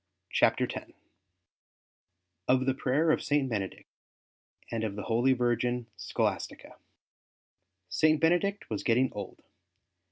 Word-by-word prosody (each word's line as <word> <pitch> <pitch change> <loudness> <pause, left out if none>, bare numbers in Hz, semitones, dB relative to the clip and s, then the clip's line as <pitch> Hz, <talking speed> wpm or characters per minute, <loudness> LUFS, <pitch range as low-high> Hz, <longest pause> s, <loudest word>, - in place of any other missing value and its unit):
CHAPTER - - +3
X - - -8 1.5
OF 130 0 +3
THE 135 - +2
PRAYER 140 +5 +2
OF - - +1
SAINT 145 -2 +1
BENEDICT, 100 -5 -3 0.9
AND 115 -1 -2
OF 105 -3 -2
THE 105 - -5
HOLY 120 +5 +3
VIRGIN 120 0 0
SCHOLASTICA 95 -2 -3 1.1
St. 155 - +3
Benedict 175 +5 +1
was 105 - -1
getting 125 +2 +2
old. 100 -2 -7
125 Hz, 115 wpm, -29 LUFS, 110-145 Hz, 1.5 s, CHAPTER